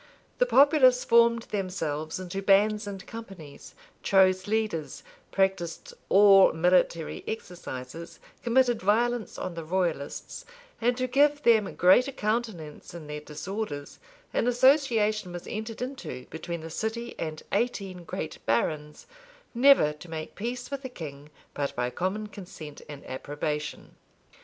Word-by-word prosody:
The - - +4
populace 275 - +5
formed 235 0 +4
themselves 165 -6 -3
into 185 +1 -5
bands 205 +2 +3
and 195 -1 -7
companies; 195 -10 -10 0.3
chose 185 0 +3
leaders; 215 -8 -2 0.3
practised 190 -4 -1 0.2
all 195 -1 +7
military 170 -1 +1
exercises; 170 - -7 0.2
committed 240 -1 +2
violence 225 +2 +1
on 185 - -4
the 165 -1 -6
royalists; 170 -4 -3 0.4
and 245 +1 +2
to 255 - 0
give 290 +3 +3
them 220 -4 +3
greater 215 +10 +5
countenance 215 - -3
in 165 -3 -8
their 150 0 -5
disorders, 150 0 -6 0.3
an - - +1
association 235 - +3
was 175 - -7
entered 220 +2 -5
into 255 - -6
between 170 +1 -5
the 165 0 -8
city 230 +6 -3
and 155 -1 -4
eighteen 195 -7 -2
great 160 -1 -6
barons, 150 +6 -1 0.5
never 250 - +5
to 150 +3 -13
make 160 -1 -6
peace 245 +5 -5
with 280 -1 -3
the 260 - -6
king 150 - -9 0.2
but 140 -1 -3
by 125 0 -1
common 190 +10 -2
consent 175 -7 -10
and 145 -2 -9
approbation. 150 +3 -5
195 Hz, 130 wpm, -27 LUFS, 160-235 Hz, 0.5 s, all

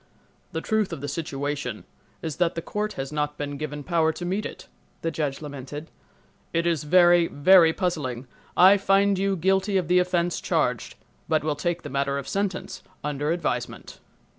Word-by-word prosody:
"The 160 -2 -3
truth 220 0 0
of - - -5
the 145 - -4
situation 140 -5 -3 0.4
is 160 -2 -4
that 175 -2 +1
the 165 - -2
court 210 +1 -3
has 135 +1 -5
not 150 -1 -2
been 145 -1 -4
given 150 0 -5
power 165 -1 +2
to 175 - -6
meet 195 +4 -1
it," - - -12 0.4
the 165 - 0
judge 150 -2 -3
lamented. 145 +1 -7 0.6
"It 165 0 +1
is 165 -4 0
very, 175 +1 +5
very 165 +3 +6
puzzling—I 160 +3 +2
find 195 0 +3
you 195 0 +1
guilty 190 +3 +2
of 180 -4 0
the 180 0 +5
offense 175 -1 0
charged, - - 0 0.3
but 155 -2 +2
will 155 -1 0
take 175 +3 -2
the 145 - -6
matter 140 +1 0
of 140 -1 -5
sentence 195 -2 -3 0.2
under 150 0 -2
advisement." 170 0 -3
165 Hz, 170 wpm, -25 LUFS, 145-185 Hz, 0.6 s, very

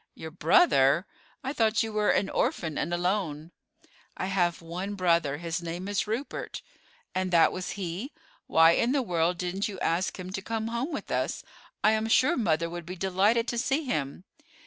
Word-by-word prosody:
"Your 160 - -8
brother? 170 - +4 0.4
I 265 +2 -2
thought 225 -4 +2
you 220 -1 -5
were 210 0 +1
an 195 - +2
orphan 160 -3 -1
and 170 - -2
alone." 175 -3 -1 0.7
"I - - -2
have 180 -3 +1
one 180 +5 -5
brother; 170 -6 +2
his 170 +1 -3
name 170 +3 -5
is 205 0 -1
Rupert." 230 +6 -4 0.5
"And 185 0 -1
that 170 -2 +5
was 185 -1 -5
he? 190 - -4 0.4
Why 165 0 +6
in 235 +8 +2
the 280 -2 +1
world 175 -3 0
didn't 180 +3 -2
you 195 -3 -7
ask 175 +3 -1
him 185 0 -6
to 195 - -4
come 225 +2 -3
home 235 +7 -2
with - - -5
us; - - -1 0.4
I 215 - +6
am 220 0 0
sure 255 +8 +4
mother 170 - +1
would 170 -1 -7
be 180 - -5
delighted 195 +6 +2
to 240 - -1
see 270 +5 0
him." 150 - -3
185 Hz, 185 wpm, -28 LUFS, 170-220 Hz, 0.7 s, Why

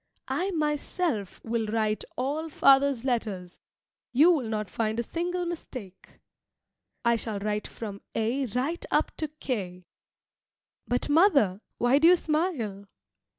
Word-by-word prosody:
I 370 +3 0
myself 300 - -1
will 225 -1 -1
write 215 0 0
all 295 +5 -2
father's 275 -3 +4
letters; 205 -8 -2 0.5
you 300 +8 +6
will 270 -10 0
not 215 -1 -2
find 220 +3 -1
a - - +1
single 350 +6 -2
mistake. 255 - -8 0.9
I 235 0 +5
shall 220 -2 -3
write 210 +1 -2
from 205 -3 -7
A 240 +5 0
right 260 - -2
up - - +1
to 310 - -2
K. 200 -12 -5 1.0
But, 245 - 0
mother, 290 - +4 0.2
why 245 +4 +4
do 325 - +6
you 360 - +8
smile? 300 - -2
245 Hz, 130 wpm, -27 LUFS, 215-310 Hz, 1.0 s, you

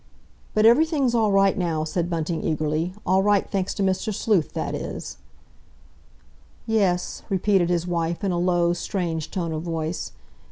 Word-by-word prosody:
"But 215 0 +4
everything's 275 +1 +4
all 220 -3 +2
right 195 0 +4
now," 170 -5 -1
said 170 +2 -2
Bunting 165 -1 -2
eagerly, 155 +3 -1
"all 190 +1 +3
right, 205 0 +2
thanks 195 -2 -1
to 200 - -1
Mr. 190 +3 0
Sleuth, 200 -5 +1
that - - -3
is." - - -6 1.5
"Yes," 195 -5 0
repeated 190 -2 +2
his 175 -1 0
wife, 170 0 -2
in 195 - +1
a 175 - 0
low, 175 -1 +2
strange 170 -3 -3
tone 170 -3 -3
of 155 - -3
voice. 165 0 -4
180 Hz, 155 wpm, -24 LUFS, 165-200 Hz, 1.5 s, But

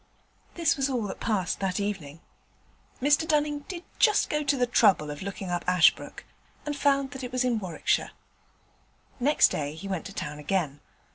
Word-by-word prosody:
This 335 -4 +2
was 270 0 0
all 250 -4 -1
that 205 - -5
passed 200 -5 -1
that 195 0 -1
evening. 170 -7 -4 0.8
Mr 290 +2 +3
Dunning 295 -1 +1
did 350 -2 -6 0.2
just 425 -3 +4
go 300 - +1
to 285 -1 +1
the 250 - +2
trouble 195 -10 +3
of 145 - -8
looking 195 -1 -5
up 175 - -1
Ashbrooke, 180 -3 +3 0.4
and 295 -1 -2
found 275 -1 +1
that 265 -2 -7
it 250 - -5
was 255 0 0
in 240 -3 +1
Warwickshire. 185 -5 -1 1.1
Next 290 +5 +4
day 145 0 -3
he 170 +5 -8
went 190 -4 -3
to 195 - -10
town 150 -5 -5
again. 150 -2 -1
215 Hz, 180 wpm, -27 LUFS, 180-280 Hz, 1.1 s, just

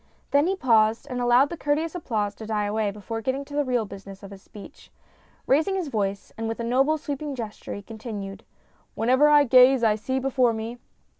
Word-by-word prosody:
Then 285 +3 +3
he 385 - 0
paused 225 - +2
and 250 0 -2
allowed 245 +3 +4
the - - -3
courteous 310 +2 -1
applause 220 - -2
to 220 +1 -10
die 210 -2 -1
away 210 0 -1
before 210 +3 -6
getting 265 +4 -2
to 285 - -13
the 290 0 +1
real 250 -4 0
business 195 0 -11
of 200 - -10
his 195 -1 -11
speech. 205 0 -14 0.6
Raising 315 +8 +2
his 360 -6 -2
voice, 200 -4 -3
and 225 - -2
with 225 +1 -4
a - - -2
noble, 270 +6 +2
sweeping 290 -1 -5
gesture, 220 -4 -7
he 205 - -8
continued: 215 -3 -7 0.3
" - - -38
Wherever 255 +6 +3
I 295 -1 +6
gaze 255 -1 +6
I 220 -2 +4
see 260 +5 -3
before 260 -2 +1
me. 225 +2 -6
240 Hz, 210 wpm, -25 LUFS, 215-275 Hz, 0.6 s, I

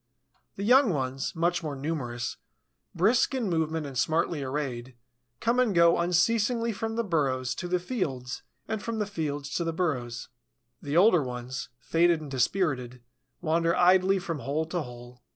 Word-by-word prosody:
The 200 - -5
young 250 +3 +6
ones, 135 -3 -2
much 175 +1 +1
more 150 -3 -4
numerous, 135 -5 -3 0.6
brisk 220 +9 +3
in 230 -8 -1
movement 160 -1 0
and 140 -2 -7
smartly 155 +4 +1
arrayed, 130 -3 -4 0.4
come 235 +2 +1
and 235 -7 +2
go 170 0 +5
unceasingly 225 +7 +2
from 225 +2 -3
the 235 - 0
burrows 135 - 0
to 175 - -5
the 180 +1 +1
fields 140 - -3 0.3
and 220 -2 -3
from 230 +3 -3
the 210 - 0
fields 145 -7 -4
to 170 - 0
the 165 -1 -2
burrows. 130 -9 -2 0.5
The 145 +3 -1
older 180 -3 +6
ones, 125 0 -5
faded 170 +4 +2
and 150 -3 -9
dispirited, 125 -3 0 0.4
wander 165 +1 +2
idly 185 +2 +5
from 175 -5 -4
hole 150 +4 -1
to 175 0 -1
hole. 125 -2 -10
165 Hz, 160 wpm, -28 LUFS, 135-190 Hz, 0.6 s, young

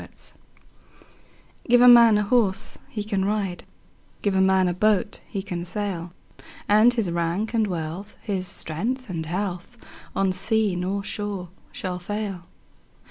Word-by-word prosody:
Gifts - - -15 1.4
GIVE 245 0 +6
a 250 - +8
man 235 -3 +8
a 210 - +1
horse 215 -2 0
he 210 - -4
can 200 -2 -1
ride, 200 -3 -2 0.6
Give 205 - +1
a 190 - +3
man 190 -1 +4
a 175 - 0
boat 210 +3 +1
he 195 -3 -4
can 175 -4 -4
sail; 180 -2 -4 0.6
And 215 +4 +6
his 225 -8 -1
rank 170 +6 -1
and 220 -2 +2
wealth, 175 +2 -5
his 190 -3 -3
strength 210 +8 -3
and 160 -2 -4
health, 180 +4 -4 0.4
On 195 -1 +2
sea 210 +1 +1
nor 190 +3 -2
shore 205 -3 -5 0.2
shall 180 -1 -4
fail. 195 -1 -4
200 Hz, 145 wpm, -24 LUFS, 180-215 Hz, 1.4 s, a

